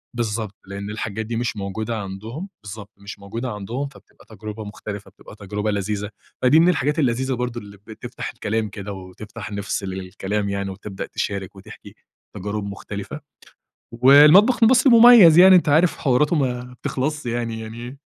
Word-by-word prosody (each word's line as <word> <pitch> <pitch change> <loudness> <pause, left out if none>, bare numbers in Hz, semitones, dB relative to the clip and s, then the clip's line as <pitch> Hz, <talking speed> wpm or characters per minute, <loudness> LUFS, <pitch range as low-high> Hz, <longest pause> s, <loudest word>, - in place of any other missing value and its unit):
بالضبط، 110 -3 -3
لإن 100 +1 -7
الحاجات 110 +1 -4
دي 115 +1 -4
مش 120 -2 -2
موجودة 110 +4 -4
عندهم، 110 - -7
بالضبط، 105 0 -9
مش 100 +1 -10
موجودة 115 +5 -5
عندهم، 115 +7 -5
فبتبقى 135 - -19
تجربة 110 +1 -7
مختلفة، 105 0 -8
بتبقى - - -15
تجربة 105 +1 -3
لذيذة. 105 +1 -3 0.3
فدي 140 +6 +5
من 175 +2 +5
الحاجات 150 -1 0
اللذيذة 130 -1 0
برضه 125 -1 -3
اللي 100 0 -13
بتفْتَح 110 - -7
الكلام 110 0 -2
كده 100 0 -7
وتفْتَح 95 +2 -10
نِفس 100 0 -3
للكلام 95 +2 -4
يعني 100 0 -3
وتبدأ 95 +1 -7
تشارِك 100 -1 -5
وتحْكِي 95 - -13 0.4
تجارب 105 +2 -4
مختلفة. 100 +7 -7 0.7
والمطبخ 150 - +6
المصري 250 +2 +5
مميز 225 -8 +8
يعني 185 0 +9
أنت 170 - +2
عارف 160 +4 +3
حواراته 145 +4 +2
ما 125 -3 -2
بتخلصش 140 +1 -3
يعني 115 -1 -3
يعني 120 +4 -9
110 Hz, 155 wpm, -21 LUFS, 100-135 Hz, 0.7 s, يعني